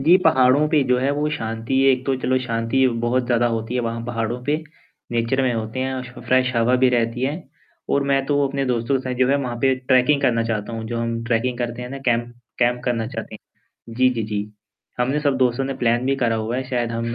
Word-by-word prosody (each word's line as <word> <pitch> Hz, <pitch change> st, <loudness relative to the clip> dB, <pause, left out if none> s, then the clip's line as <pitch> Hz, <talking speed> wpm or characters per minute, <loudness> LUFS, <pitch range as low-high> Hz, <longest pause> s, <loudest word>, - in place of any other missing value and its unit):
जी, 165 Hz, +7 st, +6 dB
पहाड़ों 135 Hz, -1 st, +4 dB
पे 150 Hz, -2 st, +3 dB
जो 125 Hz, 0 st, +3 dB
है 135 Hz, +2 st, +1 dB
वो 150 Hz, +1 st, 0 dB
शांति 115 Hz, -3 st, -3 dB
है, 135 Hz, -, +6 dB
एक 130 Hz, 0 st, -2 dB
तो 135 Hz, -, +2 dB
चलो 130 Hz, 0 st, +1 dB
शांति 115 Hz, +2 st, +1 dB
बहुत 125 Hz, +2 st, +1 dB
ज़्यादा 120 Hz, 0 st, +2 dB
होती 115 Hz, 0 st, -2 dB
है 125 Hz, -, +1 dB
वहाँ 115 Hz, 0 st, -3 dB
पहाड़ों 120 Hz, +1 st, -3 dB
पे, 145 Hz, +3 st, +1 dB, 0.6 s
नेचर 120 Hz, +3 st, +1 dB
में 125 Hz, -, +1 dB
होते 110 Hz, +2 st, -4 dB
हैं, 130 Hz, 0 st, -2 dB
सो 125 Hz, 0 st, -11 dB
फ्रेश 130 Hz, 0 st, +2 dB
हवा 115 Hz, +2 st, +3 dB
भी -, -, +6 dB
रहती 120 Hz, 0 st, 0 dB
है 135 Hz, +2 st, +1 dB, 0.6 s
और 140 Hz, -, +2 dB
मैं 135 Hz, -1 st, +2 dB
तो 145 Hz, 0 st, +2 dB
अपने 140 Hz, 0 st, -2 dB
दोस्तों 120 Hz, +1 st, 0 dB
के -, -, -6 dB
साथ 125 Hz, -, -1 dB
जो 130 Hz, 0 st, +3 dB
है 140 Hz, -, +3 dB
वहाँ 125 Hz, -4 st, -3 dB
पे 135 Hz, -1 st, +4 dB
ट्रैकिंग 130 Hz, +2 st, +2 dB
करना 115 Hz, -4 st, +2 dB
चाहता 115 Hz, -1 st, -3 dB
हूँ, 115 Hz, 0 st, -5 dB
जो 115 Hz, +1 st, -3 dB
हम 115 Hz, 0 st, -2 dB
ट्रैकिंग 120 Hz, +1 st, 0 dB
करते 120 Hz, 0 st, -3 dB
हैं 125 Hz, -, -6 dB
ना 135 Hz, -, -5 dB
कैंप 120 Hz, 0 st, 0 dB, 0.3 s
कैंप 125 Hz, 0 st, +2 dB
करना 115 Hz, -3 st, -1 dB
चाहते -, -, -7 dB, 0.3 s
हैं। 115 Hz, -, -15 dB
जी, 130 Hz, +2 st, +4 dB
जी, 120 Hz, -3 st, -2 dB
जी। 105 Hz, 0 st, -4 dB, 0.5 s
हमने 135 Hz, +5 st, +1 dB
सब 145 Hz, -3 st, +1 dB
दोस्तों 125 Hz, 0 st, +1 dB
ने 135 Hz, 0 st, -3 dB
प्लान 120 Hz, +1 st, +2 dB
भी 135 Hz, -, +1 dB
करा 115 Hz, -4 st, +1 dB
हुआ 110 Hz, +2 st, -2 dB
है, 130 Hz, -, -1 dB
शायद 120 Hz, -2 st, -1 dB
हम 115 Hz, 0 st, -3 dB
125 Hz, 240 wpm, -22 LUFS, 115-130 Hz, 0.6 s, जी